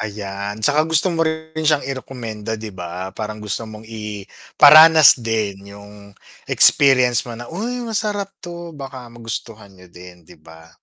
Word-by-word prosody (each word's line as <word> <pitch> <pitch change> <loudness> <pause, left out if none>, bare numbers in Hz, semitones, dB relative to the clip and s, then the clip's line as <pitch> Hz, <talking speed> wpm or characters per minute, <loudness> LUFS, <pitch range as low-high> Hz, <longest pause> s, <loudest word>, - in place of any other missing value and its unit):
Ayan, 100 0 -6
'tsaka 155 +2 +2
gusto 160 +3 +2
mo 165 - -2
rin 160 0 -3
siyang 150 -3 +1
irekomenda, 115 -5 -6
'di 110 -1 -9
ba, 90 +1 -7
parang 105 0 -7
gusto 110 +2 -5
mong 110 0 -12
iparanas 130 +8 +5
din 105 -3 -3
yung 100 0 -15 0.3
experience 125 -4 +4
mo 115 - -7
na, 120 - -9
"Uy 235 - -5
masarap 210 -3 -3
'to 170 -1 -9
baka 135 -3 -10
magustuhan 115 -2 -7
niyo 90 -1 -19
din.", 90 -1 -15
'di - - -17
ba? 80 +1 -17
115 Hz, 150 wpm, -19 LUFS, 100-155 Hz, 0.3 s, iparanas